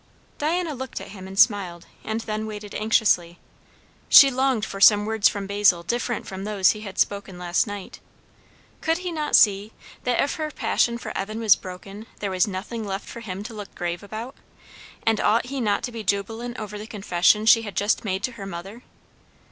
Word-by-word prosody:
Diana 325 +2 0
looked 265 0 -6
at - - -9
him 190 -2 -10
and 190 0 -9
smiled, 185 -6 +3 0.2
and 220 +1 -3
then 215 0 -4
waited 210 -1 -8
anxiously. 210 -6 +2 0.7
She 275 -1 +9
longed 260 -4 +1
for 195 -2 -7
some 205 0 +7
words 220 -1 +3
from 200 -1 -5
Basil 200 -3 +3
different 240 +4 -2
from 190 0 -7
those 200 -2 +3
he 215 - -7
had 195 -3 -8
spoken 200 -2 -1
last 175 +4 0
night. 205 -2 -8 0.8
Could 325 +1 +1
he 360 -1 -4
not 305 -2 0
see, 205 -1 +4 0.3
that 245 -1 0
if 280 - 0
her 310 -1 -2
passion 235 -5 0
for - - -7
Evan 215 +3 -4
was 220 -4 +6
broken, 195 +4 -10
there 200 -2 -3
was 185 +3 +2
nothing 210 +4 -5
left 195 -1 -5
for - - -8
him 200 -3 -6
to 220 - -8
look 205 -2 -9
grave 175 -1 -3
about? 220 +5 -7 0.7
And 225 -1 +2
ought 230 +2 +2
he 270 +1 -4
not 205 -3 0
to 245 - -3
be 230 -2 -6
jubilant 225 +5 -2
over 210 -1 -6
the 215 - -8
confession 205 0 +2
she 230 +1 +7
had 205 -4 -7
just 205 +1 +1
made 190 -2 -2
to 255 - -1
her 205 -5 -8
mother? 195 +6 -8
210 Hz, 195 wpm, -24 LUFS, 195-230 Hz, 0.8 s, She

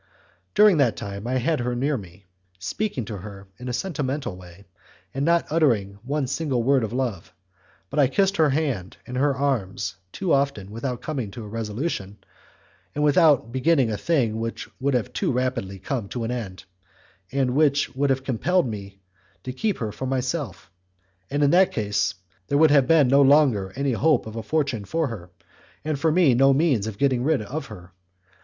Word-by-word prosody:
During 210 -4 +6
that 125 -7 +3
time 100 +2 -6
I 125 - -1
had 150 +5 0
her 120 0 -1
near 140 +4 0
me, 95 -3 -10 0.3
speaking 120 - -3
to 105 -1 -6
her 100 0 -10
in 125 +1 -6
a - - -1
sentimental 140 - -3
way, 90 +1 -14 0.5
and 135 - -2
not 170 +2 +3
uttering 110 -11 +1
one 140 +4 -1
single 130 -2 -1
word 135 0 +3
of 110 - -3
love; 120 -8 -3 0.6
but 150 - -1
I 140 - +6
kissed 195 +8 +1
her 155 -2 +4
hand 135 - -2
and 125 - -7
her 140 +1 +2
arms 100 -8 -2
too 185 - -1
often 135 -8 0
without 120 +3 -4
coming 135 -10 -3
to 115 +3 -8
a - - -8
resolution, 105 - -4 0.8
without 150 -4 +4
beginning 130 -2 +2
a - - -1
thing 120 -9 0
which 115 0 -4
would 140 0 +1
have 125 0 -1
too - - 0
rapidly 125 -6 -2
come 115 +2 -4
to 120 - -4
an 115 - -2
end, 100 -7 -5 0.7
and 130 -2 0
which 145 -3 +2
would 140 +1 +1
have 130 0 +1
compelled 140 +6 +1
me 100 -3 -7 0.4
to 130 - -5
keep 205 +9 -1
her 110 -5 -3
for 130 - -5
myself; 130 - -3 0.6
in 145 +1 +2
that 190 +2 +5
case, 105 - -1 0.3
there 140 - +1
would 155 0 +5
have 140 -3 +5
been 155 -4 +5
no 140 +3 +5
longer 135 -9 +4
any 140 0 0
hope 145 +3 +2
of 110 0 -8
a 115 - -3
fortune 135 -3 -1
for 160 +8 -1
her, 95 -6 -8 0.6
and 155 -3 -1
for 160 +2 +2
me 165 -5 +4
no 135 +3 +5
means 135 -9 +2
of 105 -2 -6
getting 130 -2 +1
rid 150 -5 +1
of 140 +6 -5
her. 90 -6 -11
130 Hz, 185 wpm, -24 LUFS, 110-145 Hz, 0.8 s, During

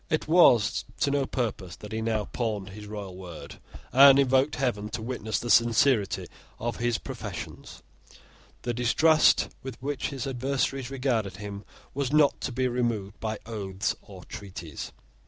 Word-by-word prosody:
It 155 -2 0
was 140 - +5 0.2
to 140 - +3
no 140 -1 +1
purpose 105 -8 -3
that 105 - -11
he 110 0 -2
now 110 -2 0
pawned 105 -5 -3
his 105 +1 -10
royal 100 -3 -7
word, 90 -3 -10 0.3
and 135 +1 +9
invoked 135 +1 +3
heaven 115 -6 -1
to - - -4
witness 110 -4 -2
the 120 +3 -2
sincerity 120 -2 +3 0.3
of 120 +1 -3
his 120 -1 0
professions. - - -8 0.8
The 120 - -1
distrust 150 +7 +4
with 130 -3 -8
which 140 0 -3
his 140 -1 -5
adversaries 135 0 -1
regarded 125 -8 -1
him 100 0 -7 0.3
was 140 -1 -2
not 150 -1 +4
to - - -2
be 130 +1 0
removed 115 -5 -2
by 110 -1 -3
oaths 100 -4 -3
or - - -12
treaties. 85 -6 -8
120 Hz, 155 wpm, -27 LUFS, 105-135 Hz, 0.8 s, and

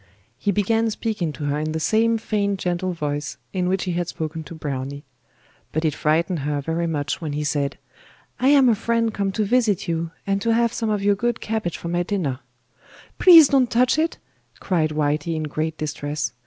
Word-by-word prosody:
He 200 - +1
began 225 +3 +1
speaking 210 -7 -2
to 150 - -7
her 145 +1 0
in 155 +1 -2
the 160 - -1
same 225 +6 +2
feigned 205 -3 -1
gentle 180 0 -1
voice 145 -3 -3 0.2
in 180 -2 0
which 190 0 0
he 185 - -2
had 175 0 -1
spoken 160 -2 -5
to 165 - -9
Browny; 140 -2 -5 0.7
but 160 +1 -1
it 155 - +2
frightened 160 +3 +1
her 145 +1 -1
very 165 +4 -2
much 145 -2 -2
when 155 -3 -3
he 150 +1 -2
said: 145 -2 -1 0.6
'I 255 - +2
am 275 -2 +6
a - - +5
friend 230 +1 0
come 200 -1 -1
to 215 0 0
visit 220 -4 +1
you, 165 0 -1 0.2
and 195 0 0
to 230 +1 +2
have 235 0 +2
some 225 -2 -2
of 210 -2 0
your 205 0 +4
good 235 +3 -1
cabbage 220 -6 -3
for 170 - -6
my 175 +1 0
dinner.' 175 -9 -2 0.8
'Please 330 -5 +9
don't 265 -4 +3
touch 250 +5 +3
it,' 325 +1 0 0.4
cried 165 -5 +1
Whitey 150 +2 -1
in 155 - -2
great 155 +1 -3
distress. 150 -3 -3
175 Hz, 200 wpm, -22 LUFS, 155-220 Hz, 0.8 s, Please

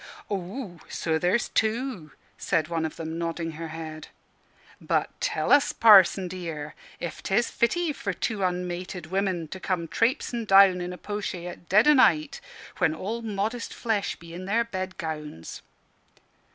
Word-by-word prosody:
"Aw, 195 0 -5
so 160 -1 -1
there's 180 +8 +1
two!" 220 - -1 0.3
said 155 -1 0
one 165 -1 -1
of 155 - -5
them, 160 0 -5
nodding 165 0 -3
her 165 +1 -6
head. 160 -1 -7 0.7
"But - - 0
tell - - 0
us, 285 0 +5
Parson 195 -4 +7
dear, 165 -5 -6 0.3
ef 170 -1 -5
'tes 220 +5 +1
fitty 325 +6 +1
for 200 -7 -3
two 210 +4 -3
unmated 180 -1 -3
women 190 -4 0
to 190 - -7
come 180 -3 -2
trapesing 235 +2 0
down 195 -2 +7
in 175 0 -4
a 180 - -7
po'shay 200 -4 -4
at 175 -1 -9
dead 210 +8 +5
o' 300 - +8
night, 305 - +3 0.4
when 165 -4 +2
all 220 +8 -4
modest 220 +2 -3
flesh 220 -4 -1
be 170 0 -13
in 180 +2 -7
their 225 +4 +2
bed 185 -4 -5
gowns?" 150 - -6
185 Hz, 155 wpm, -26 LUFS, 165-220 Hz, 0.7 s, o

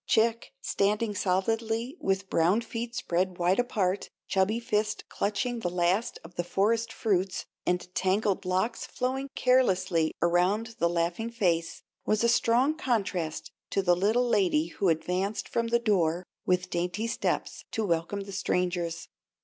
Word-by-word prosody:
Chick, 230 +1 +2
standing 210 +2 +1
solidly 225 - 0
with 195 0 0
brown 180 +6 +3
feet 235 +1 -5
spread 185 -6 -1
wide 180 +4 +2
apart, 200 -6 0 0.2
chubby 195 +4 +1
fists 215 -2 -1
clutching 210 +4 -1
the 180 - -1
last 180 +5 +1
of 165 +2 -12
the 175 - -2
forest 225 +6 +1
fruits, 195 -5 0 0.2
and 180 0 0
tangled 195 +2 +1
locks 190 +5 0
flowing 265 +2 -2
carelessly 185 -10 +3
around 185 +6 +1
the 170 - +3
laughing 175 +6 -1
face, 175 -8 0 0.2
was 215 +1 +1
a 235 - +4
strong 245 +5 +3
contrast 195 - -2 0.2
to 195 - 0
the 175 -1 +4
little 220 +7 +2
lady 180 -8 +2
who 190 +2 0
advanced 180 +5 -1
from 230 0 -1
the 235 +1 +3
door 180 -7 +1 0.2
with 180 0 +1
dainty 175 +5 -1
steps 230 - -2
to 220 -2 -1
welcome 170 +3 -1
the 200 0 -8
strangers. 180 -3 -1
195 Hz, 145 wpm, -28 LUFS, 180-230 Hz, 0.2 s, a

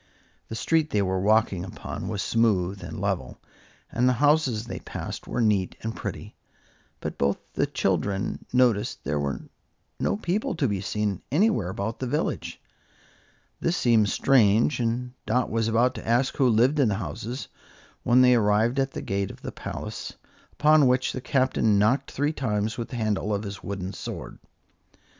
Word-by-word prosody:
The 110 - -6
street 160 +6 +1
they 105 -1 +1
were 95 0 0
walking 105 -3 +2
upon 95 - -6
was 100 - -2
smooth 100 -5 +1
and - - -6
level, - - -2 0.5
and 125 +2 +2
the - - +3
houses 135 -4 +2
they - - -6
passed - - -7
were 125 - -1
neat 105 -5 +1
and 115 0 -4
pretty; - - -6 0.7
but - - -5
both 70 - +2 0.2
the - - +1
children 100 0 -1
noticed 120 -5 +2
there 75 +2 -1
were 70 -1 -2 0.6
no - - 0
people 195 0 -1
to 145 -4 +1
be 100 -4 -1
seen 105 -1 -2
anywhere 155 - +2
about 100 +4 -4
the 130 - -2
village. 150 +5 -2 1.0
This 170 +1 0
seemed 110 -4 +3
strange, 120 +1 +3
and 125 +1 -1
Dot 125 +3 +1
was 115 0 +1
about 120 +3 +2
ask 120 +3 +1
who 130 -3 +4
lived 125 +7 +3
in 130 -6 +4
the 100 - 0
houses, 110 - -5 0.5
when 125 +1 +5
they 125 0 +6
arrived 110 +3 +3
at 135 0 0
the - - -5
gate 100 0 -1
of - - -12
the - - -4
palace, - - -6 0.4
upon 150 -2 +5
which 125 +1 +2
the 130 - -4
Captain 130 -6 +2
knocked 110 +7 +2
three 145 +3 -1
times 110 -5 -1
with 115 - -4
the - - -6
handle 110 -2 -1
of 100 - -3
his 100 -2 -6
wooden 95 0 -5
sword. - - -7
115 Hz, 170 wpm, -26 LUFS, 100-130 Hz, 1.0 s, they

